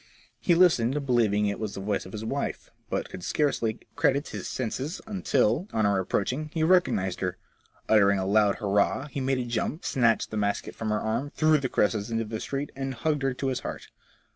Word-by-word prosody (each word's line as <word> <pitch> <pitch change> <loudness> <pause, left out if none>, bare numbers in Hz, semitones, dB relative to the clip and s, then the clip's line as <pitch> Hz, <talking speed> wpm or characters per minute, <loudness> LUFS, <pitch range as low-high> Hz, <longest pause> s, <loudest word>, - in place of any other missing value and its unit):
He 175 - +3
listened, 145 -6 +3
believing 110 -5 +2
it 100 0 -1
was 110 -2 -4
the - - -5
voice 100 -1 -2
of - - -11
his 110 +1 -5
wife, 140 +5 -3 0.2
but - - -2
could - - -7
scarcely 120 - 0
credit 140 +2 +1
his - - -5
senses, 130 - -3
until, 170 - +1
on 110 -1 +2
her 100 -1 +3
approaching, 125 +11 -1
he 160 - +1
recognized 160 - +2
hjsr. 90 -1 -2 0.5
Uttering 100 -2 +5
a 95 - -1
loud 105 0 +3
hurrah, 105 +6 +1
he 140 - -3
made 135 0 +1
a 125 - -2
jump, 120 +6 -2
snatched 115 -4 +2
the 110 - -3
basket 100 -1 -1
from 110 - -4
her 105 0 +1
arm, 115 +6 -1
threw 155 -1 +4
the 130 -2 -2
cresses 105 +1 +1
into 115 0 -1
the 110 0 -5
street, 140 +4 -4
and 135 -1 -3
hugged 150 +5 0
her 135 -1 0
to 135 +1 -1
his 130 - -1
heart. - - -7
115 Hz, 205 wpm, -27 LUFS, 105-140 Hz, 0.5 s, Uttering